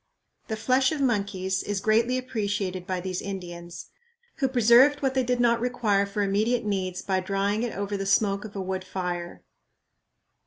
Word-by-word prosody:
"The 220 - -2
flesh 255 +4 +2
of 310 - -2
monkeys 200 -6 0
is 205 -1 -2
greatly 225 +5 +2
appreciated 205 -7 -3
by 185 -2 -2
these 185 0 -3
Indians, 175 -3 -7 0.5
who 275 - +1
preserved 255 +4 +5
what 265 -1 +1
they 265 - +2
did 250 0 0
not 235 -1 +3
require 225 -5 +1
for 205 +1 -1
immediate 215 +4 +1
needs 185 -3 -2
by 190 -1 0
drying 200 +3 -1
it 240 -4 -3
over 200 0 -2
the 195 -1 -3
smoke 200 0 +2
of 215 -1 -10
a 195 - -3
wood 190 0 -3
fire." 180 -2 -5
205 Hz, 170 wpm, -26 LUFS, 190-240 Hz, 0.5 s, preserved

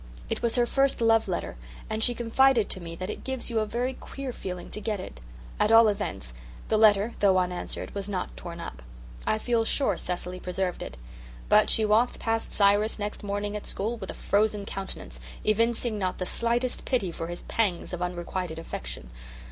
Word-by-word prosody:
It - - -1
was 235 -1 +1
her 245 -1 +4
first 275 +3 +2
love 225 -1 +4
letter - - -3 0.3
and 220 0 -1
she 245 0 +3
confided 240 0 +3
to - - -1
me 165 -1 -7
that 185 +4 -4
it - - -8
gives 260 -2 -4
you 225 - +2
a 215 - 0
very 245 +4 -1
queer 265 0 -6
feeling 180 -4 -6
to 210 - -3
get 210 -3 -1
it. 65 - -8 0.4
At 210 - +3
all 225 0 +8
events 200 - -2 0.4
the 215 - +3
letter, 215 +1 +5
though 195 -2 +5
unanswered, 180 -1 -2
was 200 0 -4
not 190 -3 -3
torn 170 -1 -7
up. 65 - -7 0.5
I 215 - +3
feel 230 +1 +1
sure 270 +4 +2
Cecily 180 0 -4
preserved 180 0 -2
it. 65 - -6 0.5
But 210 0 +6
she 220 - +4
walked 220 +4 +3
past 225 0 -1
Cyrus 205 +2 +4
next 210 0 -4
morning 205 0 -2
at 210 - -5
school 220 +4 -2
with 195 -4 -7
a - - -5
frozen 205 0 +1
countenance, 190 - -6 0.2
evincing 230 +1 +1
not 185 -2 -1
the 185 - -2
slightest 240 +4 0
pity 220 -9 0
for 165 0 -5
his 175 0 -5
pangs 195 -6 -1
of 180 - -4
unrequited 175 -1 -3
affection. - - -7
210 Hz, 195 wpm, -27 LUFS, 180-230 Hz, 0.5 s, all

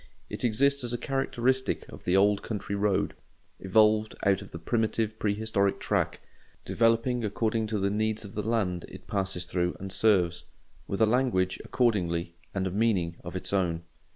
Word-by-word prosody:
It - - -4
exists 140 +4 +2
as 120 0 -2
a - - 0
characteristic 130 0 0
of - - -12
the 90 +2 +3
old 100 +1 +4
country 105 -2 -4
road, 100 -1 +1 0.5
evolved 110 +2 +3
out 100 -1 +3
of - - -10
the - - -7
primitive 110 +4 -1
prehistoric 100 -1 0
track, - - -1 0.4
developing 115 +1 +2
according 110 +1 0
to 105 0 -1
the 100 0 0
needs 110 +1 -1
of 100 - -10
the 105 - -2
land 100 -5 -1
it - - -11
passes 95 -3 -1
through 90 0 -1
and 95 0 -6
serves: 95 -4 +2 0.4
with 100 - -2
a - - +7
language, 110 -6 +1
accordingly, 90 -9 0 0.2
and 95 -1 -2
a 95 - -1
meaning 95 -5 +1
of 90 +1 -7
its 95 - -3
own. 85 -4 0
105 Hz, 170 wpm, -28 LUFS, 95-115 Hz, 0.5 s, a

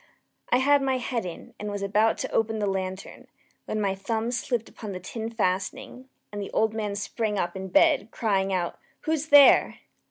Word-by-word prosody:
I 245 - +5
had 285 +2 +4
my 265 -1 +1
head 240 -5 -3
in, 170 - -9
and 210 - -4
was 205 -1 -4
about 210 +3 +2
to - - -4
open 220 0 0
the 210 - -1
lantern, 190 -1 -4 0.4
when 215 - -3
my 200 -2 0
thumb 220 +4 -2
slipped 240 -2 -2
upon 210 -4 -8
the 185 - -5
tin 220 +5 -5
fastening, 230 +5 -3 0.2
and 205 0 -5
the 200 - -5
old 220 0 +2
man 210 -2 -3
sprang 210 +1 -2
up 175 -1 -2
in 190 0 -5
bed, 280 - +3
crying 195 -4 0
out 180 -2 -2 0.2
"Who's 315 -1 -1
there?" 290 -2 +7
215 Hz, 190 wpm, -26 LUFS, 195-245 Hz, 0.4 s, there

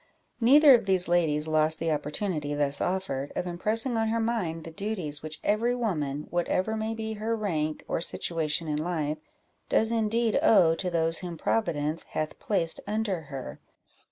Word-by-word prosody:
Neither 280 +4 +7
of 230 -5 +3
these 185 -2 +3
ladies 160 -3 +2
lost 155 0 +2
the 165 0 -1
opportunity 150 0 -2
thus 145 -1 -1
offered, 175 -7 -2
of - - -2
impressing 220 +7 0
on 225 0 +1
her 230 +1 0
mind 205 -9 -1
the 165 - -8
duties 170 -6 -4
which 155 -1 -7
every 230 +4 +1
woman, 150 - -2
whatever 185 +5 0
may 220 +1 -2
be 220 0 -4
her 220 +2 -2
rank 155 -8 -2
or - - -1
situation 165 -1 -1
in 150 -1 -1
life, 155 -3 -2 0.5
does 225 +1 +3
indeed 225 0 +1
owe 180 -7 +5
to 180 +2 -2
those 165 -1 +1
whom 175 -2 -6
Providence 160 -6 -1 0.2
hath 155 0 -3
placed 175 -6 0
under 210 -4 -1
her. 135 -3 -7
175 Hz, 165 wpm, -27 LUFS, 155-220 Hz, 0.5 s, Neither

